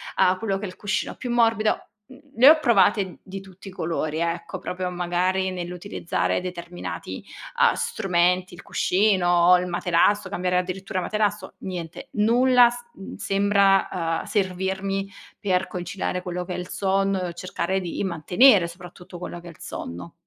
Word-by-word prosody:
a 185 0 +3
quello 200 -3 -1
che 200 - -5
è - - -3
il 180 - -10
cuscino 205 0 -2
più 245 -2 -5
morbido. 225 -2 +3 0.3
Mhmm, 260 0 -15 0.2
le 255 +5 +8
ho 315 - +7
provate 200 - +2
di 195 0 -7
tutti 190 0 -12
i - - -10
colori 160 -3 -2
ecco, 170 0 -3
proprio 180 0 -4
magari 180 +2 0
nell'utilizzare 180 -1 -2
determinati, 175 -1 -6 0.4
uhm, - - +6
strumenti, 180 - 0
il - - -12
cuscino, 180 -3 +3
il 180 0 -3
materasso, 180 +3 +2
cambiare 180 -1 -1
addirittura 185 +2 -3
materasso, 210 +1 -1
niente, 175 -3 -7
nulla 245 +3 +5
s 240 0 -7 0.2
mhmm, 195 - -9
sembra, 195 -1 +3
uhm, 165 -2 -2
servirmi, 190 0 -2 0.3
per 190 -2 0
conciliare 180 0 -4
quello 180 0 -4
che 180 - -6
è - - -4
il 180 0 -5
sonno 195 0 0
e 175 -1 -4
cercare 185 +1 -2
di 180 0 -4
mantenere 185 - +4
soprattutto 175 0 -11
quello 175 0 -7
che 175 - -13
è - - -8
il 165 - -15
sonno. 85 0 -7
185 Hz, 160 wpm, -24 LUFS, 175-200 Hz, 0.4 s, le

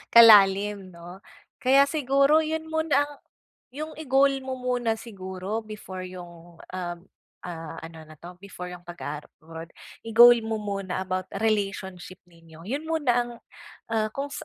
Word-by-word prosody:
kalalim 200 -4 +6
'no, 175 +3 -11 0.4
kaya 270 +2 +5
siguro 280 +1 +3
'yun 320 0 -2
muna 315 -3 +2
ang 290 0 -9 0.6
'yung 310 +2 -5
i-goal 275 -2 +3
mo 260 0 -5
muna 245 -3 -1
siguro 195 -2 -6
before 205 -4 -8
'yung 175 -2 -12 0.2
ah 175 -2 -4 0.5
ah, 165 -2 -7
ano 165 0 -10
na 155 - -13
'to, 175 +3 -13
before 180 -2 -9
'yung 175 0 -12
pag-aabroad, 165 0 -8 0.4
i-goal 240 +2 +8
mo 220 - -1
muna 195 -3 -3
about 185 0 -3
relationship 195 -4 -2
ninyo, 165 -2 -17
'yun 280 - -4
muna 315 -6 +1
ang, 240 0 0 0.6
ah, 215 -1 +1
kung 280 +1 -4
205 Hz, 135 wpm, -26 LUFS, 180-255 Hz, 0.6 s, i-goal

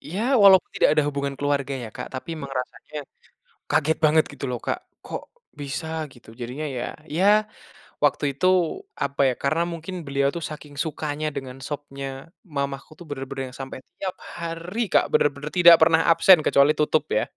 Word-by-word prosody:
Ya, 185 +7 -5 0.2
walaupun 190 -3 +7
tidak - - +3
ada 150 - +5
hubungan 140 -1 -2
keluarga 140 -1 0
ya 120 -3 -6
Kak, - - -7
tapi 145 +6 -5
emang 145 -4 -6
rasanya, 150 +4 -9 0.7
kaget 160 +3 +2
banget 155 +1 +4
gitu - - -6
loh 125 - -2
Kak, - - -3 0.3
kok - - -6 0.3
bisa 145 +3 -4 0.3
gitu. 120 -3 -17
Jadinya, 125 +6 -5
ya, - - -2 0.2
ya 170 +5 0 0.8
waktu 145 - +2
itu 140 - 0 0.6
apa 140 0 -4
ya, - - -2
karena 155 +4 +1
mungkin 170 +3 -6
beliau 140 0 +1
tuh 170 - -5
saking 150 -1 -10
sukanya 155 -1 -3
dengan 130 -1 -6
sopnya 140 -2 -6 0.5
mamaku 140 0 -3
tuh 175 - -11
bener-bener 135 -1 -5
yang - - -12
sampai 135 -1 -6 0.2
tiap 185 -1 -3 0.2
hari 170 +5 -5
Kak, - - +5
bener-bener 145 +1 +1
tidak 170 -1 +10
pernah 160 0 +5
absen 165 +2 +7
kecuali 140 +2 +5
tutup 150 0 +2
ya. - - +1
145 Hz, 170 wpm, -24 LUFS, 140-165 Hz, 0.8 s, tidak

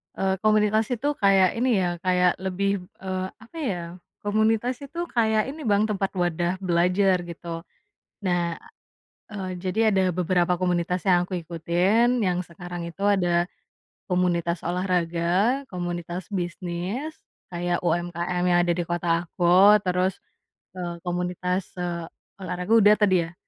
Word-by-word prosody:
eee, 190 0 0
komunitas 215 0 +3
itu 245 +4 -2
kayak 195 -2 +5
ini, 250 +3 +1
ya, 180 - +1
kayak 180 0 +2
lebih, 195 +1 -1 0.2
eee, 185 0 -2 0.2
apa, 235 +9 -13
ya, 205 - -2 0.4
komunitas 220 +4 +1
itu 280 +5 -8 0.2
kayak 220 -2 +3
ini, 310 +2 -9
Bang, 205 0 +3
tempat 195 -2 -1
wadah 175 0 0
belajar, 180 +2 +3
gitu. 170 0 -7 0.6
Nah, 175 -2 0 0.7
a - - -10
eee, - - -4
jadi 190 +3 -1
ada 190 - +3
beberapa 180 0 +1
komunitas 180 0 0
yang 180 -2 +4
aku 180 0 -4
ikutin, 180 +9 +1
yang 180 0 0
sekarang 175 +1 -8
itu 195 - -10
ada 175 -4 +2 0.6
komunitas 175 -2 +1
olahraga, 180 +6 +1
komunitas 175 0 -4
bisnis 180 - -4 0.4
kayak 175 0 0
UMKM 175 +1 -1
yang 175 0 +4
ada 175 - +2
di 175 0 -2
kota 175 0 -3 0.2
aku, 180 +4 +5
terus, 180 +1 +1 0.6
eee, 175 -1 -5
komunitas, 180 +1 -2
eee, 170 -1 -3 0.3
olahraga 180 +1 -3
udah 210 -1 +7
tadi 195 -3 +4
ya? 165 +1 -10
180 Hz, 135 wpm, -25 LUFS, 175-200 Hz, 0.7 s, udah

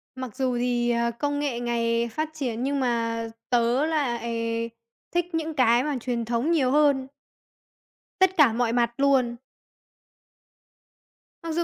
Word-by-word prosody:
Mặc 255 -4 -7
dù 255 -2 0
thì, 240 0 0
à, 235 0 +1
công 285 +4 -2
nghệ 270 -5 -2
ngày 235 -1 0
phát 310 +6 -2
triển, 250 -6 -3
nhưng 280 +1 0
mà 230 -2 -1 0.2
tớ 245 +3 +2
lại 235 -6 -1 0.4
thích 350 -1 +1
những 320 0 -2
cái 245 -3 +4
mà 295 -2 -1
truyền 235 -2 -2
thống 240 +8 0
nhiều 270 -6 +2
hơn. 285 -2 +3 1.1
Tất 375 -1 +3
cả 270 -7 +6
mọi 235 -1 0
mặt 235 -1 +2
luôn. 270 -4 +2 2.1
Mặc 330 - -4
dù 340 +2 0
245 Hz, 145 wpm, -25 LUFS, 235-285 Hz, 2.1 s, cả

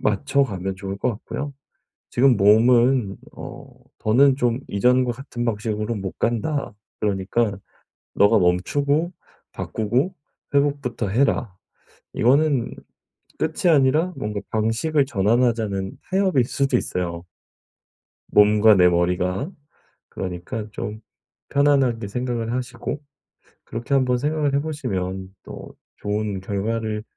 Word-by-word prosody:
맞춰가면 105 -4 0
좋을 95 0 -5
것 - - +1
같고요. 140 +6 -5 0.6
지금 125 0 +4
몸은 115 +1 +4 0.2
어 - - -9 0.3
'더는 130 +5 +4
좀 120 -2 +1
이전과 125 +4 +3
같은 120 -1 -5
방식으로는 105 -1 -2
못 95 -1 -6
간다. 120 +2 -1 0.3
그러니까 100 +1 0 0.6
네가 105 +2 +5
멈추고 140 - +1 0.4
바꾸고 125 - -1 0.4
회복부터 140 -7 0
해라.' 120 -2 +1 0.6
이거는 135 +1 +2 0.6
끝이 160 +3 +1
아니라 155 +5 +3
뭔가 105 -1 -3
방식을 115 +7 +1
전환하자는 110 -3 0
타협일 190 -9 +2
수도 135 0 +1
있어요. 85 -6 -3 1.0
몸과 105 +1 +6
내 90 -1 +6
머리가. 90 - 0 0.6
그러니까 95 +4 -5
좀 105 +1 -5 0.5
편안하게 135 -6 +2
생각을 120 +1 -3
하시고. 125 +3 -4 0.6
그렇게 115 +4 -4
한번 125 -2 +2
생각을 150 0 0
해 - - +3
보시면 95 -11 -4
또 - - -10 0.2
'좋은 105 -1 -2
결과를 105 +2 -2
115 Hz, 250 characters per minute, -22 LUFS, 100-135 Hz, 1.0 s, 몸과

